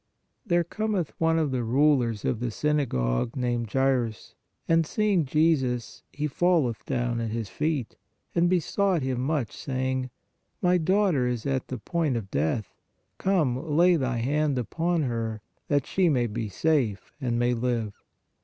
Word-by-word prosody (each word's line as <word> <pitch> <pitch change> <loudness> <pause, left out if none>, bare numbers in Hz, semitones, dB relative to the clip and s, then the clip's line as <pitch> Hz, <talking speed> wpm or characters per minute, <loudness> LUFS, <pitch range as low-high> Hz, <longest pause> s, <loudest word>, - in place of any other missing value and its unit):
There 175 -2 +3
cometh 200 -1 -2
one 165 0 +3
of 155 -4 +1
the 125 -2 -1
rulers 125 -3 +2
of 120 - 0
the 125 - -2
syna 150 +4 0
gogue, - - -1
named 120 -4 -1
Jairus, 130 -4 0 0.3
and 165 0 +4
seeing 195 0 +1
Jesus, 130 -6 +1
he 145 +1 -3
falleth 150 -6 +1
down 120 -3 -1
at 115 - -2
His 110 -2 -3
feet, 150 -6 -2 0.4
and 175 0 +3
besought 185 -1 +1
Him 130 -2 -1
much, 135 -5 -1
saying: 130 -1 -2 0.5
My 180 0 +3
daughter 180 -6 +2
is 120 -2 -2
at 135 -2 -1
the 130 - -4
point 150 +2 -1
of 100 -4 -6
death; 80 - -1 0.5
come, 170 -10 +2 0.2
lay 175 +1 +6
Thy 130 -5 -1
hand 145 +3 +1
upon 165 +7 0
her, 115 -4 -2 0.3
that 145 -2 +1
she 185 -3 +2
may 125 -5 +2
be 115 -1 -3
safe 125 - 0
and 120 -2 0
may 120 +1 +2
live. 115 -3 -1
130 Hz, 155 wpm, -26 LUFS, 120-160 Hz, 0.5 s, lay